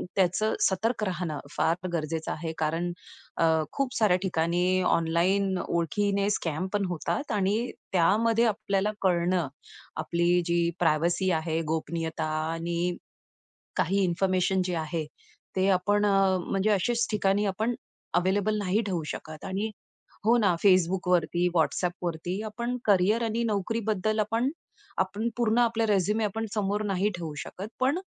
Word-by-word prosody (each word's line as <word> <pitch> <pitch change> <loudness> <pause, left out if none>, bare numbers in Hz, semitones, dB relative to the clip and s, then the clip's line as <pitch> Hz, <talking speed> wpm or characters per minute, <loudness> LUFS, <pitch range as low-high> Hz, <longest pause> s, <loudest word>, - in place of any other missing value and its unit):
त्याचं 195 +3 +2
सतर्क 210 +4 +1
राहणं 175 -5 -3 0.2
फार 170 +3 +1
गरजेचं 160 0 -2
आहे. 160 0 -4
कारण 165 +3 -1 0.5
अ, - - +2 0.3
खूप 275 -2 -1
साऱ्या 205 -5 +4
ठिकाणी 180 +1 +1
ऑनलाईन 185 +4 +2
ओळखीने 200 +4 0
स्कॅम 165 0 -2
पण 205 -1 +1
होतात. 205 - -2
आणि 210 +4 0 0.2
त्यामध्ये 225 +7 +3
आपल्याला 205 -1 0
कळणं 175 -3 +2 0.5
आपली 175 +1 +2
जी 170 -1 +2
प्रायव्हसी 170 +3 +2
आहे, 165 0 -1
गोपनीयता 160 0 -3 0.3
आणि 170 +1 -1 0.8
काही 195 +3 +2
इन्फॉर्मेशन 185 +1 +1
जे 180 - -2
आहे, 160 0 -2 0.5
ते 190 +1 +3
आपण 205 +2 +1
अ, 195 -2 +3
म्हणजे 195 +2 +1
अशाच 230 +5 +2
ठिकाणी 205 0 +1
आपण 220 +5 -1 0.5
अवेलेबल 205 +3 +1
नाही 205 +3 +1
ठेवू 175 -5 -1
शकत. 155 -1 -9
आणि 200 +3 -2 0.6
हो 235 +2 +6
ना, 200 -6 +3
Facebookवरती, 180 -2 +3
WhatsAppवरती 175 +3 -1
आपण 235 +3 -3
करियर 205 +3 +3
आणि 225 +1 -1
नोकरीबद्दल 215 0 -1
आपण, 230 +5 +1 0.5
आपण 200 +5 0
पूर्ण 230 0 +2
आपला 230 -1 +2
रिझ्युम 210 +2 +2
आपण 225 +2 -3
समोर 205 0 0
नाही 195 +2 +1
ठेवू 160 -3 -5
शकत. 195 +3 -7
पण 275 +7 +2
190 Hz, 130 wpm, -27 LUFS, 170-210 Hz, 0.8 s, हो